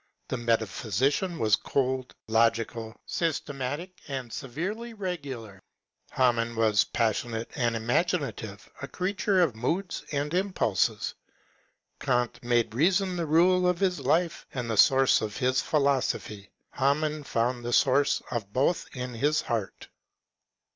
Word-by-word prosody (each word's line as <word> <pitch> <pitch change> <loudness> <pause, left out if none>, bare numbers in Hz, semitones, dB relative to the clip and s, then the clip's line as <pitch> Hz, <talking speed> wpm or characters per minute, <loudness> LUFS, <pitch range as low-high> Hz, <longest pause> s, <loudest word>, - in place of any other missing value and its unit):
The - - -1
metaphysician 120 - 0
was 110 -5 +4
cold, 130 0 -1
logical, 115 0 0
systematic, 150 +2 -3
and 130 -4 -5
severely 200 - -5
regular; 135 - -6 0.5
Hamann 115 -2 +1
was 110 -2 +3
passionate 115 0 -1
and 120 -4 0
imaginative, 120 - -1
a 140 - -4
creature 190 +2 0
of 155 -10 +2
moods 175 - -2
and 145 +1 -2
impulses. 180 - 0 0.9
E^nt 120 -2 0
made 120 -2 +1
reason 185 - +2
the 170 -2 -2
rule 180 +4 +4
of 180 -1 +1
his 185 -2 +1
life 170 0 0
and 120 -3 -2
the - - 0
source 135 +4 +5
of 105 -2 -4
his 130 0 +2
philosophy; 130 -8 0 0.2
Hamann 150 +2 0
found 120 -1 -1
the 120 - -3
source 140 +3 +3
of 110 -5 -3
both 140 +9 +1
in 125 0 -4
his 145 +6 +1
heart. 110 -5 -4
130 Hz, 125 wpm, -27 LUFS, 115-165 Hz, 0.9 s, source